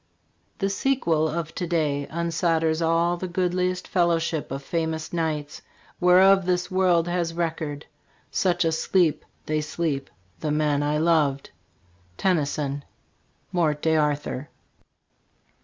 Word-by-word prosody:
The 195 -2 0
sequel 195 - +1
of 165 0 -4
to 175 - -3
day 150 -4 0
unsolders 165 -1 0
all 165 +1 +2
The 185 - -4
goodliest 180 0 -1
fellowship 170 -3 0
of 135 +1 -4
famous 160 0 -3
Knights 155 -3 -2 0.4
Whereof 185 +1 +5
this 180 0 0
world 180 -3 +3
has 175 -1 -1
record. 160 -3 -3 0.5
Such 175 -2 +1
a 165 - +2
sleep 165 0 +1 0.2
They 155 0 0
sleep 150 -3 -2 0.3
the 155 - -2
men 150 -1 +1
I 150 +1 0
loved. 150 -4 +1 0.7
Tennyson: 145 -5 0 0.3
' - - -42
' - - -41
Morte 160 -5 +1
d" 160 - +2
1 160 - +3
Arthur. 150 -2 -1
165 Hz, 130 wpm, -25 LUFS, 150-175 Hz, 0.7 s, Whereof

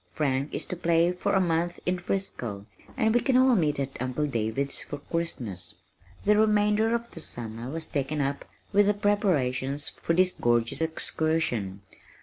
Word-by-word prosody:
Frank 140 -2 0
is - - -3
to - - -4
play 170 0 +3
for 180 +3 -1
a 195 - +4
month 175 -1 0
in 180 0 0
Frisco, 125 - -3 0.3
and 220 -3 +3
we 240 - +5
can 260 -2 +3
all 260 0 +6
meet 150 -7 +1
at 135 -2 -4
Uncle 130 +4 -1
David's 135 +1 -1
for 145 - -6
Christmas." 140 - -4 0.5
The 210 +1 +5
remainder 215 +1 +3
of 235 0 -4
the - - -9
summer 115 -4 -5
was 160 +2 -3
taken 145 +2 -2
up 140 0 -1 0.3
with 205 0 +5
the 205 - +3
preparations 145 -10 +1
for 165 - -2
this 185 +1 +4
gorgeous 120 +3 +1
excursion. 160 -11 0
160 Hz, 165 wpm, -27 LUFS, 130-195 Hz, 0.5 s, all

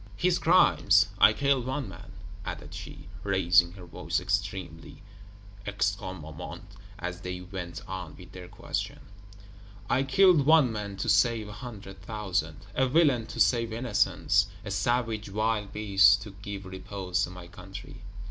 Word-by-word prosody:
"His 180 - +1
crimes. 175 +3 +4
I - - +8
killed 140 -3 +1
one 130 -1 -2
man," 95 +4 -11 0.3
added - - -7
she, - - -9 0.2
raising 90 -3 +3
her 90 -2 -11
voice 85 - -2
extremely 85 -3 -4 0.6
(extrêmement), 95 -8 -4 0.3
as 90 -1 -5
they 90 -1 -5
went 90 -2 -7
on 90 -5 -6
with 90 -1 -13
their 90 -1 -10
questions, - - -5 0.8
"I 130 - +3
killed 150 +1 +4
one 155 -6 +6
man 100 -2 -5
to - - -3
save 115 -3 +3
a - - -8
hundred 100 -5 -9
thousand; 95 -6 -3
a 130 +3 +2
villain 135 -5 +3
to - - -8
save 115 -2 +3
innocents; 110 -5 +1 0.2
a 100 - -5
savage 110 +1 -1
wild 105 0 -1
beast 100 -2 +4
to 105 - -9
give 100 0 -8
repose 95 0 -3
to - - -10
my 90 -1 -10
country. 100 +8 -11
100 Hz, 145 wpm, -28 LUFS, 90-115 Hz, 0.8 s, I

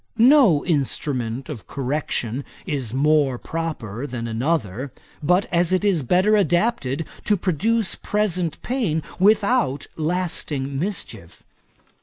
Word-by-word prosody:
No 235 - +6
instrument 135 -5 -1
of 145 -9 -8
correction 135 -2 -2 0.2
is 140 - -2
more 140 0 +2
proper 145 -7 -4
than 120 -3 -5
another, 125 - -1 0.3
but 180 +5 +3
as 175 0 +2
it 185 +2 +1
is 190 -6 +2
better 185 - +3
adapted 175 - +1 0.2
to 210 - +3
produce 195 +5 +1
present 180 -6 -1
pain 210 - -1 0.2
without 200 - +3
lasting 155 -5 -1
mischief. 165 - -5
160 Hz, 110 wpm, -22 LUFS, 135-185 Hz, 0.3 s, No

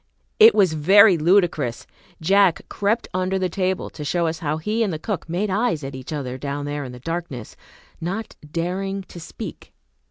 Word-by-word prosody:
It 450 +1 +8
was 185 -5 +4
very 190 +6 +6
ludicrous. 165 -7 +2 0.3
Jack 190 +1 +3
crept 215 +3 0
under 185 +1 0
the 185 -1 0
table 185 +1 -1
to 150 - -8
show 170 +4 0
us 160 -1 -2
how 155 -1 -1
he 210 +8 -1
and 210 -4 +1
the 160 - -3
cook 180 +1 -4
made 190 +4 -1
eyes 190 - 0
at 135 0 -5
each 130 +2 -8
other 130 -4 -4
down 145 +1 -4
there 145 0 -3
in 130 - -7
the 125 - -10
darkness, 165 -5 -5 0.5
not 195 +6 -4 0.2
daring 190 +4 -2
to 180 - -12
speak. 160 - -9
175 Hz, 185 wpm, -22 LUFS, 150-195 Hz, 0.5 s, It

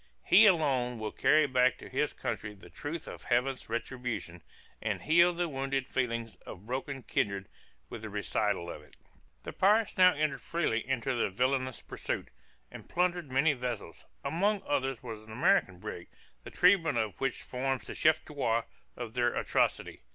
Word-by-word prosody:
He 210 +4 +8
alone 135 - +2
will 110 -1 -4
carry 155 0 +4
back 130 -2 +3
to - - -11
his - - 0
country 105 -1 -4
the 95 - -15
truth 160 +2 -6
of - - -9
Heaven's 125 +1 0
retribution, 120 -7 -4 0.4
and - - -2
heal 170 +3 +5
the 175 0 -1
wounded 135 -2 -2
feelings 115 -3 -2
of 95 +2 -11
broken 135 +2 -4
kindred 100 -3 -1 0.4
with 115 - -8
the 110 - -6
recital 105 -2 -1
of - - -9
it. 75 - -20 0.5
The - - -6
pirates 210 +1 +3
now 185 -1 +7
entered 145 -3 -1
freely 155 -10 -1
into 135 0 0
their 120 - 0
villainous 130 +4 -1
pursuit, - - -4 0.4
and - - -11
plundered 175 -3 0
many 140 +4 +3
vessels; 120 - -5 0.2
amongst 200 +5 +1
others 135 -3 -1
was 110 -3 -7
an 110 0 -13
American 140 - +2
brig, 85 -1 -7 0.4
the - - -8
treatment 170 -7 +4
of 110 -3 -2
which 135 -1 -1
forms 130 0 -2
the - - -6
chef 155 0 +3
d'oeuvre 115 -6 0 0.3
of 120 -3 -6
their 120 -1 +1
atrocity. - - 0
130 Hz, 165 wpm, -31 LUFS, 115-155 Hz, 0.5 s, He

